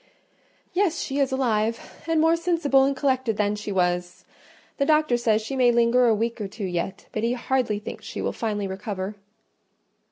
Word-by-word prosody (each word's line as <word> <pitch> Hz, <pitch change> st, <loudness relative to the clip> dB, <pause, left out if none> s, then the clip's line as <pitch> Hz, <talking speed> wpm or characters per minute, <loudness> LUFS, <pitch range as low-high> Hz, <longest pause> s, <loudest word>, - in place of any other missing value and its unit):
"Yes, 360 Hz, -3 st, +1 dB
she 275 Hz, +1 st, -2 dB
is 275 Hz, -1 st, +2 dB
alive; 230 Hz, -4 st, -1 dB
and 325 Hz, -1 st, +2 dB
more 325 Hz, +1 st, +4 dB
sensible 330 Hz, -6 st, +2 dB
and 275 Hz, 0 st, 0 dB
collected 260 Hz, -5 st, 0 dB
than 210 Hz, 0 st, +1 dB
she 210 Hz, 0 st, -5 dB
was. 180 Hz, -1 st, -1 dB, 0.5 s
The 280 Hz, -, +1 dB
doctor 305 Hz, -5 st, +3 dB
says 225 Hz, -2 st, +1 dB
she 270 Hz, +5 st, -4 dB
may 250 Hz, -2 st, +4 dB
linger 240 Hz, +1 st, +4 dB
a 225 Hz, -, +4 dB
week 230 Hz, +1 st, -2 dB
or 205 Hz, -, -2 dB
two 205 Hz, +1 st, -6 dB
yet; 180 Hz, +1 st, -3 dB
but 215 Hz, -, -3 dB
he 230 Hz, +2 st, +1 dB
hardly 250 Hz, -3 st, 0 dB
thinks 205 Hz, -, -8 dB
she -, -, -7 dB
will -, -, -1 dB
finally 210 Hz, -3 st, -2 dB
recover." 195 Hz, 0 st, -4 dB
235 Hz, 185 wpm, -24 LUFS, 210-270 Hz, 0.5 s, more